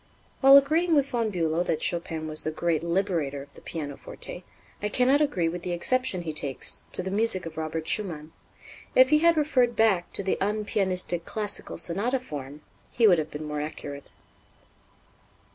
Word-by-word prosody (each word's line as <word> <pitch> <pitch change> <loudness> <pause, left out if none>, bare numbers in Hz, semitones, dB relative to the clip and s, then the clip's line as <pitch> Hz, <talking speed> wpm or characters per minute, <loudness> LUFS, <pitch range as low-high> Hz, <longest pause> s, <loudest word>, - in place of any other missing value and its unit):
While 270 0 +9
agreeing 320 +5 +3
with 280 -2 +3
Von 230 -4 0
Bülow 165 -2 0
that 155 - -1
Chopin 165 -2 -2
was 155 0 0
the - - -1
great 160 0 -1
liberator 170 -6 -1
of 140 - -19
the - - -15
pianoforte, 145 -4 -6 0.4
I 210 - -1
cannot 255 +6 +3
agree 190 - +1
with 175 +2 -4
the 175 0 -3
exception 195 0 0
he 160 -2 -4
takes 140 -3 +1
to 185 - -2
the 190 - -4
music 205 -3 +2
of 165 -1 -8
Robert 160 0 -4
Schumann. 165 -7 -1 0.6
If 260 0 +7
he 305 0 +5
had 335 0 +4
referred 260 -6 +2
back 200 -6 +2
to 200 - -2
the 190 - -1
unpianistic 195 -4 -1
classical 210 -2 -4
sonata 220 +10 0
form, 145 - -8 0.3
he 235 - +2
would 180 -6 +6
have 155 - -3
been 150 +1 -7
more 150 -1 -3
accurate. 145 -2 -7
180 Hz, 175 wpm, -26 LUFS, 155-235 Hz, 0.6 s, While